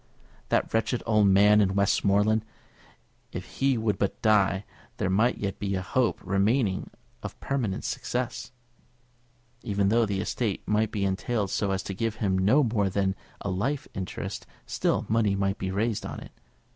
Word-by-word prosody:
That -, -, +1 dB
wretched 115 Hz, +2 st, 0 dB
old 105 Hz, -3 st, +4 dB
man 105 Hz, +2 st, +6 dB
in 95 Hz, -1 st, +1 dB
Westmoreland! 100 Hz, +2 st, +2 dB, 0.9 s
If -, -, -8 dB
he 135 Hz, -2 st, +3 dB
would 110 Hz, -2 st, 0 dB
but 100 Hz, -, -1 dB
die, 105 Hz, -2 st, +3 dB, 0.3 s
there 95 Hz, -, 0 dB
might 110 Hz, +6 st, +2 dB
yet 100 Hz, -1 st, -4 dB
be 100 Hz, -1 st, -1 dB
a 95 Hz, -, -2 dB
hope 125 Hz, +4 st, +1 dB
remaining 100 Hz, +2 st, +1 dB, 0.3 s
of -, -, -8 dB
permanent 120 Hz, -9 st, -2 dB
success! 125 Hz, 0 st, -3 dB, 1.1 s
Even 100 Hz, -4 st, 0 dB
though 115 Hz, +1 st, +3 dB
the 100 Hz, -1 st, -1 dB
estate 105 Hz, 0 st, -2 dB
might 105 Hz, +1 st, +2 dB
be 100 Hz, -2 st, -1 dB
entailed 100 Hz, +1 st, -1 dB
so 100 Hz, -, 0 dB
as 95 Hz, 0 st, -1 dB
to 95 Hz, -, -5 dB
give 115 Hz, +2 st, -2 dB
him 100 Hz, -4 st, 0 dB
no 105 Hz, +11 st, +4 dB
more 110 Hz, -5 st, +1 dB
than 95 Hz, 0 st, 0 dB, 0.3 s
a 100 Hz, -, -2 dB
life 135 Hz, +10 st, -1 dB
interest, 95 Hz, -2 st, -5 dB, 0.2 s
still -, -, 0 dB
money 110 Hz, -2 st, +2 dB
might 100 Hz, 0 st, -1 dB
be 95 Hz, -, -2 dB
raised 105 Hz, +3 st, -1 dB
on -, -, -6 dB
it. -, -, -11 dB
105 Hz, 165 wpm, -27 LUFS, 95-115 Hz, 1.1 s, man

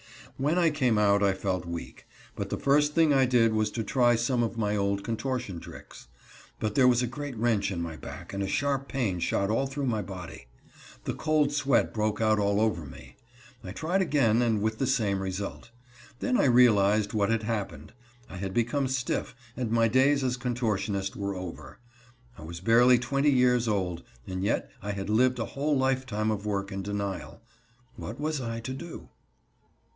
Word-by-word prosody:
When 150 Hz, +6 st, +1 dB
I 170 Hz, -3 st, +4 dB
came 130 Hz, -7 st, +1 dB
out 100 Hz, -1 st, +3 dB
I 100 Hz, -1 st, +3 dB
felt 95 Hz, -3 st, -2 dB
weak, 85 Hz, 0 st, -7 dB, 0.3 s
but -, -, -4 dB
the -, -, -2 dB
first 145 Hz, +1 st, +2 dB
thing 160 Hz, -3 st, +4 dB
I 135 Hz, -2 st, +4 dB
did 115 Hz, -3 st, +3 dB
was 110 Hz, -1 st, +1 dB
to 115 Hz, -, -2 dB
try 120 Hz, +2 st, +3 dB
some 120 Hz, +2 st, 0 dB
of 115 Hz, 0 st, -2 dB
my 105 Hz, -2 st, 0 dB
old 100 Hz, -1 st, 0 dB
contortion 115 Hz, -5 st, -3 dB
tricks. -, -, -12 dB, 0.5 s
But 105 Hz, -1 st, -1 dB
there 130 Hz, +1 st, +5 dB
was 125 Hz, 0 st, +4 dB
a -, -, 0 dB
great 140 Hz, 0 st, -6 dB
wrench 110 Hz, -2 st, +1 dB
in 95 Hz, -4 st, -3 dB
my 85 Hz, -1 st, -4 dB
back -, -, -9 dB
and 100 Hz, -, -3 dB
a 100 Hz, -, -1 dB
sharp 140 Hz, +5 st, -1 dB
pain 110 Hz, -10 st, -1 dB
shot 100 Hz, +4 st, 0 dB
all 135 Hz, +5 st, +1 dB
through 135 Hz, +1 st, -3 dB
my 110 Hz, -4 st, 0 dB
body. 90 Hz, -9 st, -9 dB, 0.6 s
The -, -, -2 dB
cold 155 Hz, -2 st, +1 dB
sweat 140 Hz, -2 st, +1 dB
broke 105 Hz, -1 st, -1 dB
out 110 Hz, -1 st, +3 dB
all 100 Hz, 0 st, +1 dB
over 110 Hz, -6 st, +1 dB
me. 70 Hz, -, -12 dB, 0.5 s
I 90 Hz, -, -7 dB
tried 175 Hz, -, 0 dB
again, 125 Hz, -, +2 dB
and 110 Hz, -4 st, +1 dB
with 110 Hz, 0 st, -1 dB
the 135 Hz, -, +1 dB
same 105 Hz, -7 st, +1 dB
result. 95 Hz, +4 st, -5 dB, 0.5 s
Then 255 Hz, -, 0 dB
I -, -, +3 dB
realized 110 Hz, -4 st, +4 dB
what 105 Hz, -1 st, +1 dB
had 115 Hz, -1 st, +1 dB
happened. 100 Hz, -9 st, -4 dB, 0.3 s
I 95 Hz, -, -9 dB
had 95 Hz, 0 st, -5 dB
become 120 Hz, +4 st, +1 dB
stiff, 130 Hz, -1 st, -2 dB, 0.2 s
and 125 Hz, -3 st, -2 dB
my 115 Hz, 0 st, +3 dB
days 135 Hz, +4 st, +3 dB
as 125 Hz, -1 st, 0 dB
contortionist 110 Hz, -6 st, -2 dB
were 100 Hz, -1 st, -3 dB
over. 80 Hz, -6 st, -8 dB, 0.6 s
I -, -, -10 dB
was 85 Hz, +2 st, -7 dB
barely 120 Hz, +4 st, +5 dB
twenty 135 Hz, +4 st, +1 dB
years 125 Hz, -3 st, +3 dB
old, 90 Hz, -5 st, -1 dB, 0.2 s
and 95 Hz, 0 st, -4 dB
yet 100 Hz, -, -1 dB
I 100 Hz, +1 st, -3 dB
had 100 Hz, +1 st, -4 dB
lived 125 Hz, +3 st, +3 dB
a 115 Hz, -, -2 dB
whole 145 Hz, +1 st, 0 dB
lifetime 130 Hz, -5 st, 0 dB
of 105 Hz, -2 st, -3 dB
work 100 Hz, -1 st, -2 dB
and 95 Hz, 0 st, -4 dB
denial. 100 Hz, -1 st, -4 dB, 0.5 s
What -, -, -7 dB
was 150 Hz, -1 st, -2 dB
I 115 Hz, -1 st, -4 dB
to 130 Hz, +3 st, -5 dB
do? 170 Hz, +5 st, -9 dB
115 Hz, 190 wpm, -28 LUFS, 100-130 Hz, 0.6 s, there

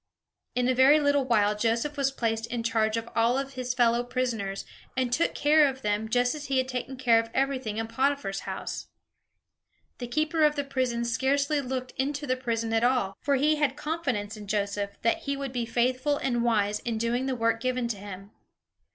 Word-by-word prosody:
In 250 Hz, 0 st, +1 dB
a 255 Hz, -, +3 dB
very 265 Hz, +4 st, +6 dB
little 285 Hz, -2 st, +2 dB
while, 210 Hz, -4 st, +3 dB
Joseph 230 Hz, +7 st, 0 dB
was 275 Hz, -2 st, +1 dB
placed 225 Hz, -4 st, -2 dB
in 240 Hz, -1 st, -3 dB
charge 225 Hz, -2 st, +1 dB
of 230 Hz, 0 st, -4 dB
all 235 Hz, +2 st, +3 dB
his 255 Hz, -2 st, -3 dB
fellow 240 Hz, -1 st, +3 dB
prisoners, 235 Hz, -6 st, -2 dB, 0.3 s
and 250 Hz, -2 st, 0 dB
took 330 Hz, -, +1 dB
care 300 Hz, 0 st, +5 dB
of 265 Hz, -1 st, -5 dB
them, 210 Hz, +1 st, -1 dB
just 245 Hz, +1 st, +2 dB
as 300 Hz, -1 st, -7 dB
he 270 Hz, -1 st, 0 dB
had 260 Hz, 0 st, +1 dB
taken 255 Hz, +1 st, -4 dB
care 240 Hz, -3 st, +4 dB
of 230 Hz, 0 st, -3 dB
everything 260 Hz, -5 st, -1 dB
in 225 Hz, 0 st, -2 dB
Potiphar's 260 Hz, -4 st, 0 dB
house. -, -, -5 dB, 1.1 s
The 245 Hz, -, -4 dB
keeper 310 Hz, +5 st, +1 dB
of 300 Hz, 0 st, +4 dB
the 285 Hz, -, -1 dB
prison 255 Hz, -4 st, -1 dB
scarcely 280 Hz, +5 st, +1 dB
looked 255 Hz, -1 st, -4 dB
into 285 Hz, +3 st, -1 dB
the 255 Hz, -2 st, +1 dB
prison 230 Hz, -3 st, -2 dB
at 225 Hz, +1 st, +2 dB
all; 245 Hz, -6 st, +1 dB
for 280 Hz, -1 st, +2 dB
he 300 Hz, +3 st, +3 dB
had 290 Hz, -2 st, +1 dB
confidence 275 Hz, -10 st, -2 dB
in 210 Hz, -1 st, -10 dB
Joseph, 200 Hz, 0 st, -2 dB
that 230 Hz, +8 st, +2 dB
he 280 Hz, -3 st, -3 dB
would 275 Hz, -2 st, -5 dB
be 240 Hz, -2 st, -2 dB
faithful 255 Hz, +5 st, +1 dB
and 240 Hz, -4 st, 0 dB
wise 210 Hz, -3 st, +1 dB
in 230 Hz, -2 st, -3 dB
doing 240 Hz, +3 st, 0 dB
the 260 Hz, -, -1 dB
work 230 Hz, -1 st, +1 dB
given 255 Hz, -1 st, 0 dB
to 220 Hz, -, -2 dB
him. 195 Hz, 0 st, -9 dB
250 Hz, 200 wpm, -27 LUFS, 225-275 Hz, 1.1 s, very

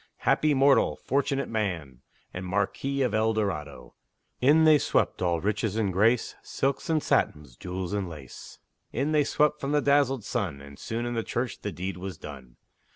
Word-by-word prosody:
Happy 150 Hz, -1 st, +3 dB
mortal! 135 Hz, +1 st, +4 dB
fortunate 140 Hz, +1 st, -1 dB
man! 85 Hz, -, -3 dB, 0.3 s
And 90 Hz, -, -5 dB
Marquis 100 Hz, +9 st, -1 dB
of 125 Hz, -5 st, 0 dB
El 110 Hz, +1 st, +2 dB
Dorado! 90 Hz, -9 st, -3 dB, 0.5 s
In 150 Hz, +5 st, +5 dB
they 155 Hz, -2 st, +6 dB
swept, -, -, 0 dB
all 85 Hz, -2 st, +1 dB
riches 105 Hz, +2 st, -1 dB
and 105 Hz, -4 st, 0 dB
grace, 115 Hz, +6 st, +2 dB
Silks 135 Hz, +4 st, -2 dB
and 155 Hz, -2 st, +1 dB
satins, 75 Hz, -5 st, 0 dB
jewels 90 Hz, +5 st, -5 dB
and 100 Hz, -3 st, -2 dB
lace; 75 Hz, -5 st, -11 dB, 0.3 s
In 140 Hz, +6 st, -1 dB
they 150 Hz, -1 st, +4 dB
swept 150 Hz, +1 st, +1 dB
from 140 Hz, +1 st, -2 dB
the 150 Hz, -, +4 dB
dazzled 140 Hz, -4 st, +2 dB
sun, 95 Hz, -, -2 dB
And 70 Hz, 0 st, -13 dB
soon 115 Hz, +1 st, -3 dB
in 120 Hz, -, -2 dB
the 115 Hz, -, 0 dB
church 120 Hz, +2 st, -3 dB
the 105 Hz, -, -3 dB
deed 90 Hz, +2 st, -5 dB
was 95 Hz, -2 st, -6 dB
done. 65 Hz, -6 st, -10 dB
110 Hz, 175 wpm, -27 LUFS, 90-135 Hz, 0.5 s, they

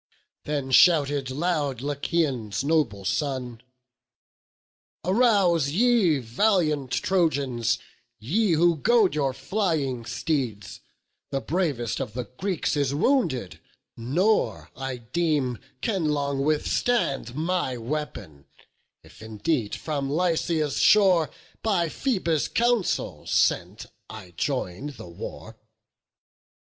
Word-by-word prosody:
Then 140 Hz, -3 st, -2 dB
shouted 145 Hz, -3 st, +4 dB
loud 145 Hz, -3 st, -1 dB
Lycaon's 140 Hz, -6 st, -1 dB
noble 140 Hz, -11 st, 0 dB
son: 125 Hz, +1 st, -2 dB, 1.4 s
"Arouse 185 Hz, -, +3 dB
ye, 205 Hz, -3 st, +3 dB
valiant 150 Hz, -, +1 dB
Trojans, 135 Hz, -, +1 dB, 0.4 s
ye 175 Hz, -, +1 dB
who 170 Hz, +1 st, +3 dB
goad 215 Hz, +3 st, +3 dB
Your 140 Hz, -3 st, 0 dB
flying 135 Hz, -, -2 dB
steeds; 115 Hz, -, -3 dB, 0.5 s
the 135 Hz, -, -1 dB
bravest 145 Hz, -, -1 dB
of 105 Hz, -, -4 dB
the 125 Hz, +1 st, -3 dB
Greeks 165 Hz, -, -2 dB
Is 140 Hz, -1 st, 0 dB
wounded, 160 Hz, -, 0 dB, 0.4 s
nor, 175 Hz, -, 0 dB
I 135 Hz, -1 st, -4 dB
deem, 135 Hz, -1 st, -1 dB, 0.2 s
can 195 Hz, -7 st, 0 dB
long 140 Hz, -2 st, -1 dB
withstand 150 Hz, -, 0 dB
My 160 Hz, -5 st, -1 dB
weapon, 115 Hz, -, -6 dB, 0.6 s
if -, -, -17 dB
indeed 110 Hz, +2 st, -2 dB
from 140 Hz, -3 st, -3 dB
Lycia's 160 Hz, -2 st, 0 dB
shore 185 Hz, -6 st, +5 dB, 0.3 s
By 180 Hz, -7 st, +1 dB
Phoebus' 175 Hz, -, 0 dB
counsel 235 Hz, -5 st, 0 dB
sent -, -, +1 dB, 0.2 s
I 105 Hz, -5 st, -10 dB
join'd 130 Hz, -, -3 dB
the 110 Hz, -3 st, -10 dB
war." 85 Hz, -, -9 dB
145 Hz, 100 wpm, -25 LUFS, 125-175 Hz, 1.4 s, shore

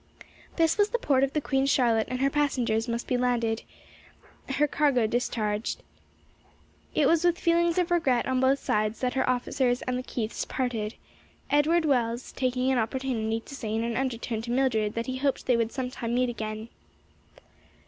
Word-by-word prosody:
This 330 Hz, +3 st, +2 dB
was 410 Hz, 0 st, +4 dB
the 480 Hz, -, 0 dB
port 275 Hz, -, +2 dB
of 275 Hz, -, 0 dB
the 300 Hz, -, +1 dB
Queen 270 Hz, -1 st, +1 dB
Charlotte 235 Hz, -5 st, +3 dB
and 255 Hz, +1 st, -3 dB
her 275 Hz, -, +3 dB
passengers 250 Hz, -6 st, 0 dB
must 235 Hz, 0 st, -2 dB
be 250 Hz, -, 0 dB
landed, 235 Hz, -3 st, 0 dB, 0.9 s
her 280 Hz, +2 st, +2 dB
cargo 280 Hz, -5 st, +2 dB
discharged. 215 Hz, -2 st, -2 dB, 1.1 s
It -, -, +4 dB
was 335 Hz, 0 st, +3 dB
with 350 Hz, -1 st, +3 dB
feelings 340 Hz, 0 st, +2 dB
of 355 Hz, -1 st, +1 dB
regret 270 Hz, -9 st, +2 dB
on 260 Hz, -1 st, 0 dB
both 265 Hz, +1 st, +3 dB
sides 215 Hz, -3 st, -1 dB
that 250 Hz, -1 st, 0 dB
her 265 Hz, -, +1 dB
officers 250 Hz, 0 st, 0 dB
and 250 Hz, 0 st, -2 dB
the -, -, -3 dB
Keiths 230 Hz, -3 st, -3 dB
parted; 235 Hz, -4 st, -3 dB, 0.6 s
Edward 315 Hz, +3 st, +3 dB
Wells 240 Hz, -4 st, 0 dB
taking 255 Hz, 0 st, 0 dB
an 260 Hz, -, +2 dB
opportunity 225 Hz, -2 st, -1 dB
to 275 Hz, -, -12 dB
say 220 Hz, -5 st, -4 dB
in 225 Hz, -, 0 dB
an 235 Hz, 0 st, -2 dB
undertone 235 Hz, -3 st, -2 dB
to 235 Hz, -, -8 dB
Mildred 240 Hz, -5 st, +1 dB
that 230 Hz, 0 st, -2 dB
he 260 Hz, -1 st, -3 dB
hoped 275 Hz, 0 st, -1 dB
they 250 Hz, -, +3 dB
would 230 Hz, -1 st, 0 dB
sometime 250 Hz, -3 st, -3 dB
meet 250 Hz, 0 st, +2 dB
again. 215 Hz, -1 st, -5 dB
250 Hz, 180 wpm, -27 LUFS, 230-275 Hz, 1.1 s, was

